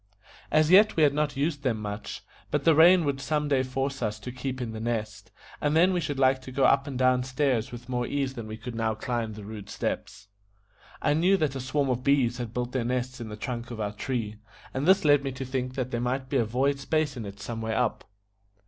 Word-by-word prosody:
As 155 +1 +3
yet 205 +3 +7
we 160 - +4
had 145 -2 +5
not 150 -1 -1
used 145 0 -1
them 125 -5 0
much, 105 0 -6 0.3
but - - 0
the 165 - +6
rain 170 +2 +6
would 140 -1 -1
some 150 +1 0
day 140 -2 +2
force 135 +1 -3
us 105 -2 -2
to 125 - -6
keep 130 +1 -4
in 120 -3 -3
The 110 - -6
Nest, 110 -3 -3 0.3
and 150 +1 +1
then 180 +3 +5
we 180 - +1
should 145 -3 -3
like 130 0 +3
to 130 - -9
go 135 +1 0
up 135 0 +4
and 135 -3 -4
down 130 0 +3
stairs 130 -2 0
with 120 0 -9
more 125 -1 -1
ease 140 -2 -1
than 115 -4 -7
we 110 0 -6
could 125 +1 -7
now 115 -1 -1
climb 115 -1 -3
the 105 0 -9
rude 105 -2 -8
steps. 95 - -4 0.8
I - - +3
knew 180 +6 +3
that 155 -6 0
a - - -3
swarm 135 +1 0
of 125 0 -2
bees 130 -3 +2
had 120 -3 -4
built 125 +1 -3
their 130 -2 -1
nest 125 +1 -2
in 115 - -6
the 105 - -6
trunk 120 +1 -5
of 120 -2 -7
our 105 -1 -2
tree, 110 -2 -3 0.4
and 135 +4 -1
this 190 -3 +5
led 145 -2 +5
me 135 - -2
to 130 +1 -5
think 130 0 -3
that 130 -1 -3
there 120 - -1
might 130 +2 -2
be 140 - +1
a 120 - +2
void 135 +5 0
space 150 0 0
in 120 - -5
it 100 -1 -8
some 115 +2 -5
way 110 0 -2
up. 125 -3 0
130 Hz, 250 wpm, -27 LUFS, 115-140 Hz, 0.8 s, yet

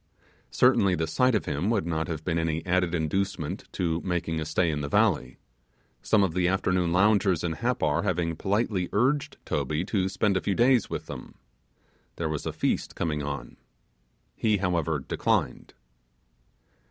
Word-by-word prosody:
Certainly 95 -2 +4
the 80 -1 -1
sight 120 +10 +2
of 105 - 0
him 75 +8 -1
would 110 -7 +1
not 80 -2 -1
have 80 -2 -4
been 85 -1 0
any 80 0 -2
added 90 -1 +1
inducement 90 +1 -2
to 85 -3 -1
making 85 -3 -2
a 80 - -3
stay 80 +2 +1
in 75 -1 -2
the 70 - -4
valley, - - +1 0.6
some 105 -2 +3
of 90 -4 0
the 90 0 +1
afternoon 90 -2 +1
loungers 95 -1 +3
in 85 - 0
Happar 80 -6 0
having 90 -4 -1
politely 100 0 -1
urged 135 +7 +1
Toby 80 +3 -1
to 95 -2 0
spend 100 +1 +1
a - - -1
few 100 - -1
days 120 -2 +3
with - - -4
them, - - -9 0.8
there 80 -2 -2
was 75 -2 -3
a - - -1
feast - - -1
coming 75 -3 -1
on. 70 -3 -6 0.8
He, 110 -2 +1
however, 85 -4 0
declined. 65 - -1
90 Hz, 165 wpm, -27 LUFS, 80-100 Hz, 0.8 s, Certainly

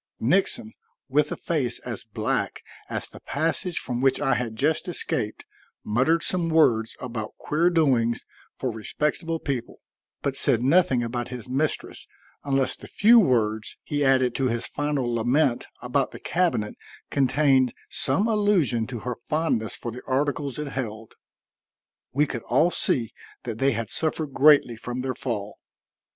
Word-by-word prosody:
Nixon, 195 - +1 0.4
with 150 +2 +2
a - - -1
face 145 -8 0
as - - -6
black - - -2 0.3
as - - -3
the - - -12
passage 165 +4 -1
from 125 -1 -1
which 135 0 +3
I 135 - +2
had 115 -3 -2
just 150 +9 0
escaped, 125 -10 -2 0.4
muttered 130 +10 +2
some 175 -2 -1
words 120 -9 +3
about 115 -4 -6
queer 165 +4 +1
doings 130 -9 +2 0.3
for 130 - -2
respectable 150 +9 -2
people, 135 -6 -4 0.4
but - - -1
said 115 - +2
nothing 135 -4 +4
about 120 +1 -3
his 125 -2 -7
mistress 140 +4 -1 0.4
unless 135 -2 +1
the - - -12
few 230 +3 +6
words 110 - +1
he 145 -1 -1
added 130 -2 +3
to 135 0 0
his 115 -1 -1
final 145 -4 -1
lament 120 +3 +1 0.2
about 130 +2 +1
the - - -9
cabinet 170 -12 0 0.4
contained 135 -2 +3
some 165 +12 +1
allusion 200 - +2
to 120 -4 -6
her 125 - -3 0.2
fondness 150 -9 0
for 120 - -5
the 125 +2 -8
articles 140 0 -1
it 150 -1 -4
held. 115 -5 -5 1.0
We 145 +3 +3
could 120 -5 -5
all 155 +9 +4
see 115 -9 0 0.3
that 115 -3 -5
they 135 -1 +3
had 115 -1 -4
suffered 155 -3 -1
greatly 140 -5 +5
from 120 +2 -4
their 130 0 -2
fall. 105 -6 -4
130 Hz, 150 wpm, -25 LUFS, 120-155 Hz, 1.0 s, few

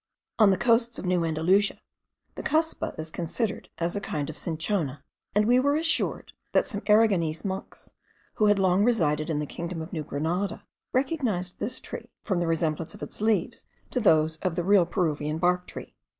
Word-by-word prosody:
On 215 -2 +7
the 190 - +3
coasts 235 0 +2
of - - -5
New 180 -1 +2
Andalusia, 165 +6 +2 0.5
the - - -6
cuspa 320 +2 0
is 155 0 -5
considered 200 +7 -3
as 170 +2 -1
a 200 - -2
kind 150 -6 -3
of - - -13
cinchona; 160 -4 -2 0.3
and 210 0 +4
we 245 +3 +5
were 285 +2 +2
assured, 325 +1 +1 0.2
that - - +4
some 205 -5 -3
Aragonese 200 -7 +3
monks, 190 0 -6 0.5
who 215 - +4
had 205 -1 +4
long 190 0 +3
resided 155 -10 +2
in 155 - 0
the 150 - -1
kingdom 170 +3 -5
of 160 +4 -7
New 155 -3 -2
Grenada, 165 +8 -2 0.3
recognised 250 - -1
this 250 +4 -2
tree - - -8
from 190 -5 0
the 170 - 0
resemblance 160 -1 -1
of - - -9
its - - -9
leaves 220 -1 0 0.3
to 250 - 0
those 160 -7 +3
of 180 0 -2
the 175 - -1
real 190 -2 +4
Peruvian 155 -4 -1
bark 180 +1 +1
tree. - - -9
180 Hz, 185 wpm, -27 LUFS, 160-215 Hz, 0.5 s, On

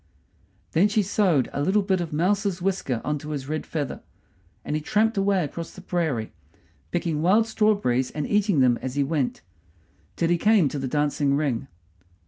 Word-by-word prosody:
Then 180 +6 +4
she 210 0 +1
sewed 185 - +2
a 140 - -2
little 195 +7 +2
bit 190 -2 +1
of 170 - -4
a - - -3
mouse's 195 +2 +1
whisker 175 -11 -1
on 150 0 -1
to 150 - -9
his 140 -3 -4
red 155 +1 -3
feather; 145 -5 -4 0.6
and 150 - -2
he 155 - -1
tramped 220 +7 +1
away 195 -2 +2
across 165 +3 -5
the 185 - -11
prairie, 160 -12 -2 0.6
picking 165 -3 -1
wild 200 +7 +4
strawberries 205 - +1
and 150 -1 -4
eating 205 -7 +2
them 125 -2 +3
as 130 0 -4
he 145 - +2
went, 140 - -1 0.7
till 165 - 0
he 175 0 +2
came 210 -6 +4
to 145 - -4
the 135 - -3
dancing 145 0 +1
ring. 140 -3 -1
165 Hz, 185 wpm, -25 LUFS, 140-195 Hz, 0.7 s, Then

